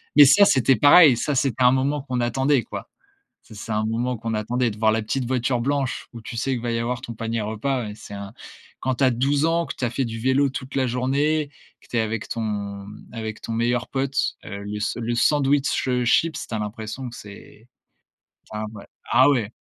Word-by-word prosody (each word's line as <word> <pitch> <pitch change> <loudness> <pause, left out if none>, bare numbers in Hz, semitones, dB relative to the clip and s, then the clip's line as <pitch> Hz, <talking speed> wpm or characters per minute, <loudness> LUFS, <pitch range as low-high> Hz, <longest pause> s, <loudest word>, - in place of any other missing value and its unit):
mais 145 - +10
ça, 200 +9 +7
c'était 130 - +3
pareil. 145 +1 +7
Ça, 145 +4 -1
c'était 130 -2 +1
un 125 +1 +6
moment 140 +2 0
qu'on 125 -2 -3
attendait, 130 +2 +1
quoi. - - -8 0.6
Ça 110 - -14
c'est 105 +2 -7
un 110 0 0
moment 120 +3 -1
qu'on 115 +1 -4
attendait, 120 +3 0
de 105 - -10
voir 110 0 +3
la 110 +1 0
petite 125 +4 -2
voiture 125 0 0
blanche, 140 +1 -2
où 115 - -9
tu 115 +2 -8
sais 130 +3 0
que - - -7
va 120 0 -2
y 115 - 0
avoir 120 +1 -2
ton 120 - -7
panier 115 0 -3
repas. 120 +5 -2
Ouais, 105 - -6
c'est 105 - -11
un 100 -1 -7 0.5
quand 130 0 0
tu 135 - -1
as 130 - +4
12 140 +5 +1
ans, 165 +1 +1
que - - -6
tu - - -7
as - - 0
fait 130 +3 -1
du 115 -1 -5
vélo 130 +4 +2
toute 130 0 -7
la 130 -2 +1
journée, 140 +5 0 0.3
que - - -21
tu 120 - -2
es 115 - +3
avec 110 0 -3
ton 100 -3 -4 0.3
avec 110 -2 -6
ton 115 - -5
meilleur 120 +1 0
pote, 135 0 -2 0.3
heu, 100 -1 -6
le 105 +1 -5
s 105 - -1
le 120 0 -2
sandwich, 140 +2 +2
heu, 125 -1 +1
chips, 160 +6 +1
tu - - -8
as - - -2
l'impression 110 +4 -5
que 120 - -11
c'est 105 +2 -13 0.8
enfin 105 0 -4
voilà. 105 - -11 0.2
Ah - - +6
ouais. 115 -7 0
120 Hz, 230 wpm, -23 LUFS, 110-135 Hz, 0.8 s, mais